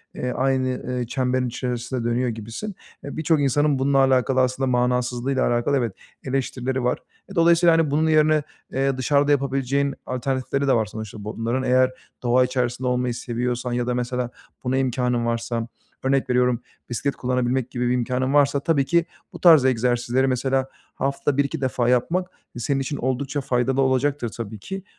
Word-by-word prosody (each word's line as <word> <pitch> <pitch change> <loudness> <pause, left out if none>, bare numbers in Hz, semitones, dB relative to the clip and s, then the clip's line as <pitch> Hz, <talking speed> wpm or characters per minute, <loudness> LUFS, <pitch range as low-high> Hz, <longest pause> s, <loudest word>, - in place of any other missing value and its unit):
eee, 125 - -2
aynı, 130 0 +1 0.3
eee, 120 - -3
çemberin 130 +1 0
içerisinde 125 0 -3
dönüyor 120 +2 0
gibisin. 115 - -6 0.3
E, 140 - -7
birçok 160 0 +2
insanın 145 +1 +2
bununla 135 +1 +2
alakalı 130 -1 +3
aslında 130 +1 0
manasızlığıyla 125 +1 +1
alakalı 120 +4 +1
evet, 120 -6 -1 0.3
eleştirileri 130 -1 -2
var. 125 - 0 0.3
E, - - -9
dolayısıyla, 170 0 +5
hani, 160 -3 +1
bunun 155 +2 +2
yerine, 155 -1 +4 0.3
eee, 135 0 0
dışarıda 145 +3 +2
yapabileceğin 140 0 +1
alternatifleri 130 +2 -1
de 135 - +4
var 115 -3 +2
sonuçta 110 -1 -8
bunların. 115 +4 -2
Eğer 130 0 +3 0.3
doğa 125 +1 +4
içerisinde 125 0 -1
olmayı 125 0 0
seviyorsan 120 +1 -3
ya 120 0 -1
da 125 - +1
mesela 125 0 -2 0.3
buna 130 +1 0
imkânın 125 -2 0
varsa 115 0 -2 0.4
örnek 135 0 +1
veriyorum, 125 -1 +2 0.3
bisiklet 125 +4 -2
kullanabilmek 125 0 -1
gibi 125 0 -1
bir 125 - +2
imkânın 125 +2 0
varsa, 145 -1 +4
tabii 140 -1 +1
ki 170 +3 +2 0.3
bu - - -8
tarz 160 -7 +7
egzersizleri, 125 +1 +1
mesela, 130 +1 0 0.3
haftada 140 +1 -1
1-2 140 +2 0
defa 125 -2 0
yapmak 165 +9 +1 0.3
senin 135 +3 0
için 140 +2 -3
oldukça 135 +3 -2
faydalı 130 +1 +1
olacaktır 130 -1 +1
tabii 110 -1 -7
ki. 195 - -6
130 Hz, 160 wpm, -23 LUFS, 125-140 Hz, 0.4 s, tarz